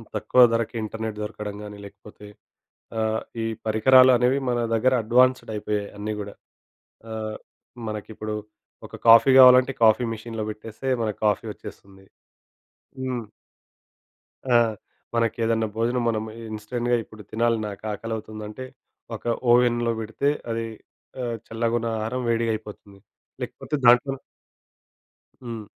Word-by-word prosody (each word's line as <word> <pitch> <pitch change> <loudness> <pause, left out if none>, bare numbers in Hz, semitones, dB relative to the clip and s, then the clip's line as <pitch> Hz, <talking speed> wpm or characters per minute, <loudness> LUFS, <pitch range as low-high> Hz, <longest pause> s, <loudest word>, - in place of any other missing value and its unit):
తక్కువ 110 +4 +3
ధరకు 115 0 -1
ఇంటర్నెట్ 110 0 -5
దొరకడం 105 -1 -6
గానీ, 105 0 -9
లేకపోతే 105 +1 -14 0.7
ఆహ్, 110 0 0 0.2
ఈ - - -1 0.2
పరికరాలనేవి 125 +3 +5
మన 120 -1 0 0.2
దగ్గర 130 +3 +3
అడ్వాన్స్‌డ్ 125 +1 +3
అయిపోయాయి 105 -1 -3
అన్నీ 105 +1 -3
గూడా. 100 -1 -7 0.8
ఆహ్, 110 -1 -4 0.5
మనకిప్పుడు 110 0 -5 0.5
ఒక - - -10
కాఫీ 115 +4 +8
గావాలంటే 130 +1 +8
కాఫీ 110 +2 +5
మెషీన్‌లో 110 0 -5
పెట్టేస్తే, 110 +4 -9 0.2
మనకు 105 -3 -3
కాఫీ 105 +2 0
వచ్చేస్తుంది. 95 -1 -13 1.0
హ్మ్. 125 -3 -3 1.3
ఆ! 120 - +4 0.6
మనకేదన్నా 115 -1 +1
భోజనం 120 +2 0
మనము 110 -1 -2 0.2
ఇన్‌స్టంట్‌గా 120 +3 -2
ఇప్పుడు 110 0 -14
తినాలి, 115 +1 +1
నాకు 100 +1 -9
ఆకలవుతుందంటే, 110 +2 -6 0.5
ఒక - - -10 0.3
ఓవెన్‌లో 120 -1 +3
బెడితే 110 +6 -1 0.2
అది 115 0 -2 0.6
ఆహ్, 120 -2 -3
చల్లగా 115 +1 -1
ఉన్న 115 - -3
ఆహారం 115 +4 -3
వేడిగయిపోతుంది. 110 -3 -3 0.4
లేకపోతే 150 - -4
దాంట్లో 125 +3 +6 1.3
హ్మ్. 115 -3 -6
115 Hz, 110 wpm, -24 LUFS, 105-120 Hz, 1.3 s, కాఫీ